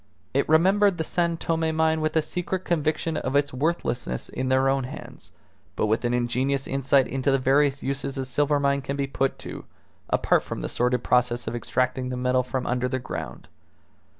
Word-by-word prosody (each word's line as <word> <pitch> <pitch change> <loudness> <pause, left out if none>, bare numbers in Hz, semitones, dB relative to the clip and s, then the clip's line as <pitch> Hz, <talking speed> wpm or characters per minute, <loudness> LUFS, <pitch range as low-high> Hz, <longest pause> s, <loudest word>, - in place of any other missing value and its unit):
It 140 +2 +1
remembered 190 +4 +4
the 160 - -1
San 170 +1 0
Tome 160 -1 0
mine 160 0 +2
with 155 0 -1
a 160 - +3
secret 180 +2 -3
conviction 160 0 0
of 130 - -2
its 145 -1 +2
worthlessness 125 - -2
in 130 0 -3
their 130 +1 +3
own 135 -1 +1
hands, 130 - -10 0.5
but - - +1
with 110 +2 +1
an 120 - +1
ingenious 125 +3 0
insight 135 0 +2
into 135 +1 -1
the 135 - +4
various 135 +1 +2
uses 135 0 -3
a 135 - -2
silver 145 +2 +1
mine 140 0 +1
can 140 +1 -4
be 140 - 0
put 135 0 -1
to, - - -8 0.5
apart - - +3
from - - -6
the - - -3
sordid 125 0 0
process 125 -1 +2
of - - -3
extracting 125 +1 -1
the 125 - -3
metal 125 0 +2
from 125 +1 -3
under 125 +1 0
the 130 - -1
ground. 65 - -6
135 Hz, 195 wpm, -25 LUFS, 125-155 Hz, 0.5 s, remembered